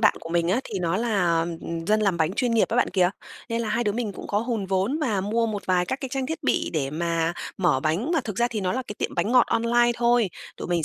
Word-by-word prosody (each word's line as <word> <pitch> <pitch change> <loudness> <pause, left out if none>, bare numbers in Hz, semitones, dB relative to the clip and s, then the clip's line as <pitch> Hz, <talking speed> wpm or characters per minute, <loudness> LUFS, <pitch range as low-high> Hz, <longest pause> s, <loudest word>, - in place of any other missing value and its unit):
bạn 210 - +5
của - - -8
mình 170 0 +1
á 220 +8 +2
thì 205 - -4
nó 175 0 0
là 180 -8 +1 0.4
dân 215 +2 +3
làm 195 -4 +2
bánh 160 +1 +1
chuyên 245 +4 0
nghiệp 225 - +3
á, 230 - -1
bạn 245 - +2
kìa. 180 -1 +3 0.4
Nên 230 0 -1
là 220 - -3
hai 235 +3 0
đứa 205 - +1
mình 220 -2 -2
cũng - - -8
có 205 - 0
hùn 225 -3 -2
vốn 195 +9 0
và 220 -10 0
mua 225 +4 0
một 210 -2 -3
vài 180 -1 +2
các 260 +8 -3
cái 270 - -4
trang 270 -1 -1
thiết 320 +3 -4
bị - - +1
để 140 -5 -1
mà 165 +1 0 0.2
mở 170 -8 +2
bánh, 165 - 0
mà 325 - +3
thực 210 -4 -5
ra 240 +2 +2
thì 225 -3 -3
nó 185 -2 0
là 260 - -1
cái 205 - -6
tiệm - - -2
bánh 225 - 0
ngọt 250 -2 +6
online 240 +1 +3
thôi. 235 -4 +3 0.3
Tụi - - -6
mình 170 -2 +1
210 Hz, 280 wpm, -25 LUFS, 180-235 Hz, 0.4 s, ngọt